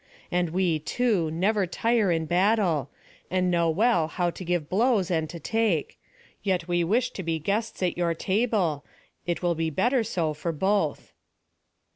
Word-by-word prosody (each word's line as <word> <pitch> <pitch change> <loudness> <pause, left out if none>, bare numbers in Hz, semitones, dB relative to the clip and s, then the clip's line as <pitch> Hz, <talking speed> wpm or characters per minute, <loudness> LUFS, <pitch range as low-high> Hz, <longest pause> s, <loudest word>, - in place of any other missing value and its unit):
And 175 -1 +1
we, 175 -2 +1
too, 195 0 0
never 190 +4 +1
tire 225 +1 +1
in 165 -1 0
battle, 180 - +2 0.4
and 180 -1 +1
know 170 -1 +2
well 175 -1 +2
how 175 +1 -1
to 185 - -9
give 175 -3 -1
blows 205 - +2
and 160 -2 0
to 170 - -7
take; 220 -6 -1 0.4
yet 185 -4 -1
we 175 -1 +1
wish 225 +9 +1
to - - -6
be 165 -2 -1
guests 200 +6 -2
at 180 -1 -1
your 170 -1 +1
table; 190 - 0 0.4
it 175 +1 -2
will 175 -1 +2
be 165 0 -1
better 235 - +1
so 165 -7 -1
for 160 +3 -3
both." 190 -1 -1
180 Hz, 165 wpm, -26 LUFS, 165-205 Hz, 0.4 s, battle